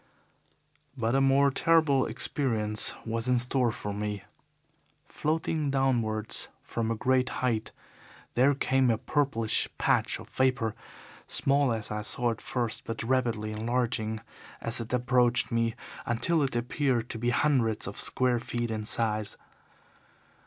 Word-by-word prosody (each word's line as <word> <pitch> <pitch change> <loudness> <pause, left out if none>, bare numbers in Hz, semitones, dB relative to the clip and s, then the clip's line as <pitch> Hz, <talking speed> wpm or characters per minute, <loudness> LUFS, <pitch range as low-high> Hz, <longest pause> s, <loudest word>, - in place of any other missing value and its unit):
"But 115 -1 0
a 135 - +3
more 135 +1 +4
terrible 155 -3 +3
experience 110 -3 +1
was 115 +2 -1
in 125 - +4
store 125 0 +2
for 105 -1 -5
me. 105 -1 -4 0.8
Floating 155 -1 -1
downwards 120 -5 0 0.2
from 115 -1 -3
a 115 - 0
great 130 +2 +1 0.2
height 110 -3 -1 0.6
there 135 +3 +4
came 130 -1 +2
a 115 - +2
purplish 130 -5 0
patch - - +1
of - - -11
vapour, 130 -4 +1 0.5
small 140 -1 +2
as 110 -2 -3
I 105 0 -2
saw 120 +2 0
it 115 - -6
first, 125 -4 -2
but 115 0 -4
rapidly 115 -3 0
enlarging 110 0 -1 0.4
as 115 +1 -1
it 115 - -7
approached 125 -1 +2
me, 115 -1 +1 0.3
until 155 +8 +1
it 135 -3 -1
appeared 120 0 0
to 115 - -6
be 120 +1 0
hundreds 120 -4 +1
of 100 - -6
square 125 -2 +1
feet 120 0 -3
in 110 -1 -3
size. 110 -2 0
120 Hz, 140 wpm, -28 LUFS, 110-130 Hz, 0.8 s, more